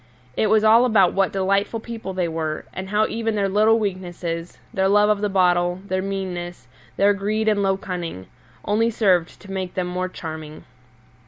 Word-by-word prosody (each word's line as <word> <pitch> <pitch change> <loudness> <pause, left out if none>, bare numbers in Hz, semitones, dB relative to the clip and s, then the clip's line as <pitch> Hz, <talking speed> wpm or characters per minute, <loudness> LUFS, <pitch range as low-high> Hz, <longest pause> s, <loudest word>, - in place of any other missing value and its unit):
It 215 - +2
was 215 0 +4
all 225 +3 +6
about 205 -7 +4
what 195 -1 +1
delightful 200 +3 0
people 225 -3 -7
they 180 -2 -1
were, 160 -1 -3
and 190 0 -6
how 210 +1 +2
even 225 -1 -2
their 200 -1 +1
little 215 +3 +4
weaknesses 175 -4 -4 0.2
their 190 -3 +2
love 205 +1 +4
of 205 -1 0
the 210 - 0
bottle, 180 -2 +2
their 185 -1 -1
meannesses, 180 -6 -5 0.3
their 200 +1 +4
greed 210 +2 -1
and 210 -2 +3
low 195 -1 +1
cunning 175 - -5 0.4
only 225 +3 +2
served 185 -7 +1
to 200 - -11
make 190 -2 -4
them 185 - -1
more 180 +1 -3
charming. 155 -3 -8
195 Hz, 180 wpm, -22 LUFS, 180-210 Hz, 0.4 s, all